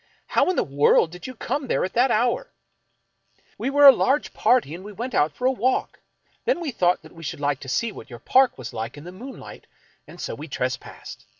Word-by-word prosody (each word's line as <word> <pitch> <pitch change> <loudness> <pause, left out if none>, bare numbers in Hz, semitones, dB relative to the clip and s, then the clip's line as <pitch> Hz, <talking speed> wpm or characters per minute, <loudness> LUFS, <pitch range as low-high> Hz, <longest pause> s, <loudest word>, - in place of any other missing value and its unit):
How - - +2
in 370 - +1
the - - +2
world 145 +3 +3
did 180 +4 -9
you 255 - -8
come 280 +4 -3
there - - +1
at 185 - -6
that 250 +3 +3
hour? 240 - +1 0.4
" - - -48
" - - -37
We - - -1
were 285 +1 +5
a 275 - +13
large 270 +3 0
party 240 - +2
and 175 +3 -8
we 210 - -9
went 240 +5 -6
out 150 +1 +2
for 250 - -6
a 260 - +5
walk. 255 +1 -1 0.4
Then 470 -6 +1
we 325 -5 -3
thought 180 -6 +1
we 165 - -13
should 150 - -5
like 145 -2 0
to 135 - -9
see 205 - -1
w^hat - - -11
your 120 - -9
park 255 - +3
was 130 -3 -8
like 115 +5 -5
in 145 - -10
the 175 - -9
moonlight, 245 +9 -11 0.4
and - - -13
so - - -4
we - - -8
trespassed. - - -5
225 Hz, 235 wpm, -24 LUFS, -, 0.4 s, a